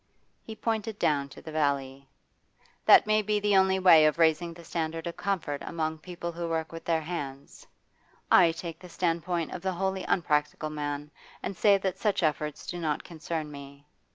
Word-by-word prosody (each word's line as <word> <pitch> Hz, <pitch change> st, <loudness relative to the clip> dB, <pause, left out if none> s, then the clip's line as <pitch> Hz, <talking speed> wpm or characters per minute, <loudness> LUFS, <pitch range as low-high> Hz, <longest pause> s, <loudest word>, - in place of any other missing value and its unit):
He 220 Hz, -, -9 dB
pointed 220 Hz, -1 st, -2 dB
down 145 Hz, -6 st, +1 dB
to -, -, -13 dB
the 160 Hz, -, -8 dB
valley. 140 Hz, -3 st, -1 dB, 0.8 s
'That -, -, +8 dB
may 215 Hz, 0 st, +3 dB
be 210 Hz, 0 st, 0 dB
the 205 Hz, -1 st, +2 dB
only 190 Hz, 0 st, +4 dB
way 170 Hz, -5 st, +7 dB
of 155 Hz, -, 0 dB
raising 165 Hz, +1 st, +3 dB
the 170 Hz, 0 st, -12 dB
standard 165 Hz, 0 st, -3 dB
of 170 Hz, -, -4 dB
comfort 160 Hz, -8 st, -2 dB
among 160 Hz, -1 st, -3 dB
people 170 Hz, +1 st, -6 dB
who 170 Hz, 0 st, -4 dB
work 160 Hz, -1 st, -2 dB
with 165 Hz, 0 st, -8 dB
their 165 Hz, -1 st, +1 dB
hands; 140 Hz, -5 st, -7 dB, 0.6 s
I 175 Hz, -3 st, +7 dB
take 165 Hz, 0 st, -7 dB
the 180 Hz, 0 st, -12 dB
standpoint 170 Hz, -1 st, -1 dB
of 175 Hz, -, -6 dB
the 190 Hz, 0 st, -1 dB
wholly 190 Hz, +1 st, -2 dB
unpractical 150 Hz, -2 st, 0 dB
man, 145 Hz, 0 st, -4 dB, 0.3 s
and 195 Hz, -, -3 dB
say 200 Hz, +2 st, +5 dB
that 190 Hz, -1 st, -3 dB
such 205 Hz, -4 st, +1 dB
efforts 150 Hz, -1 st, -1 dB
do 175 Hz, -, -5 dB
not 155 Hz, -3 st, -1 dB
concern 160 Hz, -2 st, -5 dB
me. 140 Hz, 0 st, -11 dB
165 Hz, 180 wpm, -28 LUFS, 150-185 Hz, 0.8 s, That